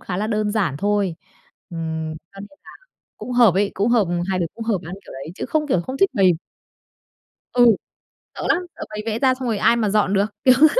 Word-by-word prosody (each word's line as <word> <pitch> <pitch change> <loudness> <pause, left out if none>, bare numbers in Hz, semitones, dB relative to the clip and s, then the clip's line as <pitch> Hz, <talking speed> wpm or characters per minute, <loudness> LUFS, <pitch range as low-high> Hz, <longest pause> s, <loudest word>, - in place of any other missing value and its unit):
khá 180 - -4
là 210 +3 -1
đơn 215 -1 0
giản 185 -11 0
thôi, 200 -4 0 0.5
ừm, 160 -1 -4 0.2
cho 195 - -11
nên 210 +9 -12
là - - -12 0.5
cũng 245 +4 -6
hợp 235 -7 +5
ấy, 200 +1 +2
cũng 200 +4 +1
hợp, 225 -6 +3 0.2
hai 185 -1 0
đứa 170 - 0
cũng 230 - -6
hợp 220 -5 +1
ăn 175 - -6
kiểu - - -11
đấy 135 +5 -8
chứ - - -5
không 310 -1 0
kiểu 185 - +2
không 260 +8 -5
thích 390 - +4
bày. 190 -2 +5 1.2
Ừ, 245 -1 +5 0.7
sợ - - -7
lắm, 360 - +2
sợ - - -9
bày 210 0 -5
vẽ 225 0 -1
ra 260 -2 +4
xong 255 -1 -4
rồi 220 - 0
ai 235 +3 +4
mà 215 -3 +1
dọn 205 -2 +2
được, 200 +1 +3 0.2
kiểu 255 -1 +7
thế. 310 - +9
210 Hz, 235 wpm, -21 LUFS, 185-235 Hz, 1.2 s, thế